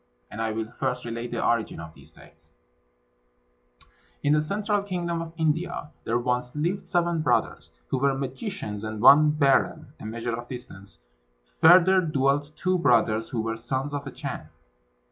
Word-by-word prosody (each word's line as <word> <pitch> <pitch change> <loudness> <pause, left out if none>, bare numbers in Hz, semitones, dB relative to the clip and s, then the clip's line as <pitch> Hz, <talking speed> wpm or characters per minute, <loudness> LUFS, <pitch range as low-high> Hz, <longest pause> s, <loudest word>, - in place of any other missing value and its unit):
And 110 - -5
I 110 -1 -1
will 110 +1 -4
first 125 0 -2
relate 115 +1 -4
the 120 - -2
origin 115 -2 0
of 80 -1 -9
these - - -14
tales: - - -18 1.7
In 145 - +3
the 150 - +3
central 205 +5 -1
kingdom 175 -4 -3
of 165 -1 -6
India 160 -1 -1
there 115 - +1
once 125 +1 -2
lived 175 +6 -1
seven 170 -2 0
brothers, 155 - 0 0.2
who - - 0
were 135 0 +2
magicians; 135 - -5
and 110 0 -5
one 145 +6 +7
berren 140 -3 +1
(a - - -9
measure 115 +1 -3
of 120 +1 -8
distance) 100 - -9 0.4
further 180 - +6
dwelt 145 -2 0
two 185 0 0
brothers, 115 -6 +2
who 115 - -2
were 115 0 -2
sons 130 +5 -3
of 145 0 -4
a - - -5
Chan. - - -6
135 Hz, 165 wpm, -26 LUFS, 115-165 Hz, 1.7 s, one